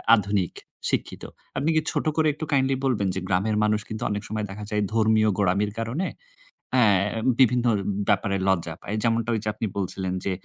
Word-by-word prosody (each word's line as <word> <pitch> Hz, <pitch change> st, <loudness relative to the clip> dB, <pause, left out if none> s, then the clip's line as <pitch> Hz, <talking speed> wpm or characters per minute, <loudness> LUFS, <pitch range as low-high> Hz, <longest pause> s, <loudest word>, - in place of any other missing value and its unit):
আধুনিক, 100 Hz, -3 st, -1 dB, 0.4 s
শিক্ষিত। -, -, -2 dB, 0.3 s
আপনি 140 Hz, +4 st, +1 dB
কি 155 Hz, -, +4 dB
ছোট -, -, -1 dB
করে 155 Hz, -1 st, +4 dB
একটু 155 Hz, +2 st, -5 dB
কাইন্ডলি 135 Hz, -1 st, +3 dB
বলবেন, 110 Hz, -7 st, +1 dB
যে -, -, -1 dB
গ্রামের 100 Hz, +4 st, +1 dB
মানুষ 105 Hz, 0 st, +2 dB
কিন্তু 110 Hz, 0 st, -4 dB
অনেক 105 Hz, 0 st, -2 dB
সময় 105 Hz, 0 st, -2 dB
দেখা 105 Hz, +2 st, -7 dB
যায় 105 Hz, -1 st, 0 dB
ধর্মীয় 110 Hz, -1 st, +3 dB
গোড়ামির 100 Hz, +1 st, +1 dB
কারণে, 125 Hz, +12 st, -2 dB, 0.7 s
অ্যা 125 Hz, -3 st, +5 dB, 0.5 s
বিভিন্ন 125 Hz, -1 st, +4 dB, 0.4 s
ব্যাপারে 100 Hz, 0 st, +2 dB
লজ্জা 85 Hz, -4 st, +1 dB
পায়। 105 Hz, -, -4 dB
যেমনটা 115 Hz, 0 st, +1 dB
ঐ -, -, +2 dB
যে 105 Hz, -, 0 dB
আপনি 110 Hz, -, -3 dB
বলছিলেন 95 Hz, -1 st, -2 dB
যে, 100 Hz, -, 0 dB
105 Hz, 180 wpm, -25 LUFS, 100-120 Hz, 0.7 s, অ্যা